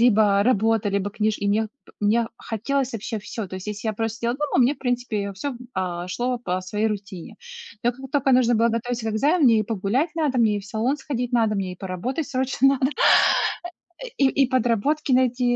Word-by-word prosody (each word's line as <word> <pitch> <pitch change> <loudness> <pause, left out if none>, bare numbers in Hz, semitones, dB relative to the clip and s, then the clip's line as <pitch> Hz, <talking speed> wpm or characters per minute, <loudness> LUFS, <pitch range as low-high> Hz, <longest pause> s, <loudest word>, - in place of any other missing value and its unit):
либо 210 -4 +4
работа, 225 -2 +2
либо 200 0 -1
книж 215 +1 0
и 200 - -1
мне, 215 +2 +2 0.2
п - - -19
мне 225 +2 +2
хотелось 260 +4 -2
вообще 225 0 -4
всё. 210 0 -6
То 185 - -8
есть, 185 - -8
если 210 +1 -4
я 220 - 0
просто 225 +1 -3
сидела 235 +1 -1
дома, 295 -2 -1
мне, 260 +5 +3
в - - -25
принципе, 240 -5 -2
всё, 195 +9 -4
м 245 - -8 0.2
а, 180 -2 -3
шло 245 +6 -2
по 185 -6 -2
своей 210 +4 -2
рутине. 200 -4 -5 0.5
Но 240 +1 +2
как 265 +2 -11
тока 275 -2 +2
нужно 245 -1 +4
было 230 +1 +3
готовиться 230 0 -2
к - - -4
экзамену, 295 +9 +2
мне 230 -3 +6
и - - +1
погулять 225 - -1
надо, 300 -6 0
мне 215 -3 +3
и - - -6
в - - -14
салон 230 +7 -1
сходить 250 -4 -4
надо, 225 -3 +2
мне 190 -2 -2
и 180 - -10
поработать 195 - -4
срочно 265 0 +2
надо, 260 - +2 1.2
а - - -5
и 275 - +4
и 270 0 +2
подработки 260 +4 +1
найти, 250 -1 +2
230 Hz, 215 wpm, -23 LUFS, 205-255 Hz, 1.2 s, мне